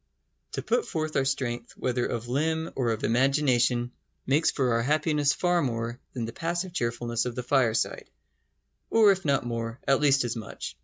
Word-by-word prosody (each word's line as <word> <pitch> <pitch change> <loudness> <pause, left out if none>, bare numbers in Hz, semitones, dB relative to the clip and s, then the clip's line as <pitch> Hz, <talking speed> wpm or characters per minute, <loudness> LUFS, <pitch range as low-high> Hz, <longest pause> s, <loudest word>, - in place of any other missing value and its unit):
To - - -3
put 480 - 0
forth 155 -1 -3
our 135 - +2
strength, 120 -3 -2
whether 125 -1 0
of 120 0 -4
limb 160 +5 -1
or 125 -3 0
of 110 -1 -2
imagination, 125 -1 +2 0.3
makes 145 +5 +3
for 130 -4 +1
our 115 - +2
happiness 150 +2 +2
far 175 +4 +1
more 120 -2 -2
than 120 -3 -3
the 115 - -7
passive 175 +4 -3
cheerfulness 120 -4 -1
of 125 -2 -4
the 125 - -3
fireside; 120 -3 +1 0.8
or 220 -3 +6
if 190 -2 -2
not 140 -4 +1
more, 115 0 -4
at 135 +1 +3
least 140 -2 +4
as 120 -1 -2
much. 110 -3 -7
130 Hz, 175 wpm, -27 LUFS, 120-150 Hz, 0.8 s, or